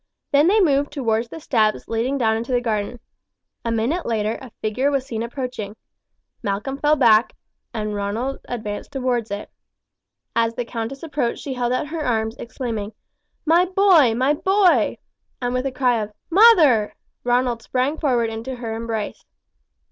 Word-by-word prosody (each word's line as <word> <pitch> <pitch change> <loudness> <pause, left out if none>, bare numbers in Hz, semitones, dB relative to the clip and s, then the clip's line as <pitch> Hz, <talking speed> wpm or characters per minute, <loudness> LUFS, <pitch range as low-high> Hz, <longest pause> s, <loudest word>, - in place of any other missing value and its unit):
Then 290 +3 +5
they 420 +4 +4
moved 285 -6 +2
towards 235 -5 0
the 325 - -8
steps 220 -8 +1
leading 235 +5 -1
down 220 -4 +2
into 230 +3 -4
the 245 - +3
garden. 225 0 -2 0.6
A 230 - -1
minute 240 +11 0
later 220 -1 -1
a 260 - -9
figure 250 +6 0
was 275 -2 0
seen 225 -4 -4
approaching. 235 -4 -5 0.7
Malcolm 210 +8 -3
fell 300 +1 +3
back, 230 -4 +4 0.4
and 215 -2 -3
Ronald 210 +7 -2
advanced 215 -2 -5
towards 250 -4 -1
it. 205 +1 -6 0.8
As 230 0 +1
the 245 - -3
countess 235 +4 -5
approached 290 -7 -2
she 275 - -4
held 245 -1 -1
our 255 - 0
her 310 +1 -4
arms, 225 -3 0
exclaiming: 225 -4 -5 0.5
"My 335 +3 +5
boy, 365 - +4
my 260 +4 +2
boy!" 380 +4 +3 0.4
and 245 -1 -2
with 255 +2 0
a - - -3
cry 250 -3 +1
of 210 0 -6 0.2
"Mother!" 325 - +6 0.3
Ronald 245 -1 +1
sprang 260 +6 -1
forward 240 -6 +1
into 230 +4 -5
her 235 -2 -5
embrace. 225 -2 -4
245 Hz, 160 wpm, -22 LUFS, 225-275 Hz, 0.8 s, Mother